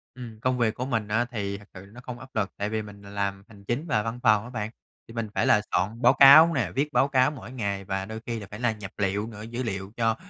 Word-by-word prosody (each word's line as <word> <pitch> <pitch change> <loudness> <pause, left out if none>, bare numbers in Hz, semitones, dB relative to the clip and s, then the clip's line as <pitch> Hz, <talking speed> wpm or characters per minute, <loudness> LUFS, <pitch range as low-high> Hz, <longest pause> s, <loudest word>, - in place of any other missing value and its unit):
Ừm, 115 -4 -9
công 130 0 +1
việc 115 -2 +2
của 125 - -3
mình 115 -5 -1
á, 110 +3 +1
thì 100 -3 -3
thật 105 - -15
sự 95 0 -11
là 100 - -18
nó 125 - -11
không 125 -1 -7
áp 130 0 -14
lực, 100 -3 0
tại 100 +1 -2
vì 110 0 -1
mình 100 -1 -11
làm 100 -1 -3
hành 100 -3 -16
chính 125 +9 -2
và 105 -7 +1
văn 115 +2 -4
phòng 105 -1 +4
á 120 - -9
bạn, 110 -3 -4 0.4
thì 115 - -12
mình 115 -2 -3
phải - - +2
là 105 - +5
soạn 105 +6 -1
báo 125 +2 +6
cáo 155 +5 +9
nè, 115 - -1
viết 150 +2 0
báo 135 - +4
cáo 130 +1 +3
mỗi 130 -4 -10
ngày 100 -6 -3
và 95 0 -2
đôi 110 +1 -6
khi 115 -2 -3
là 100 - -9
phải 105 - -7
là 120 -2 +2
nhập 105 -3 -8
liệu 100 +2 0
nữa, 105 -2 -9
dữ 120 +3 -5
liệu 95 -2 -4
cho, 115 -1 +2
110 Hz, 290 wpm, -26 LUFS, 100-125 Hz, 0.4 s, cáo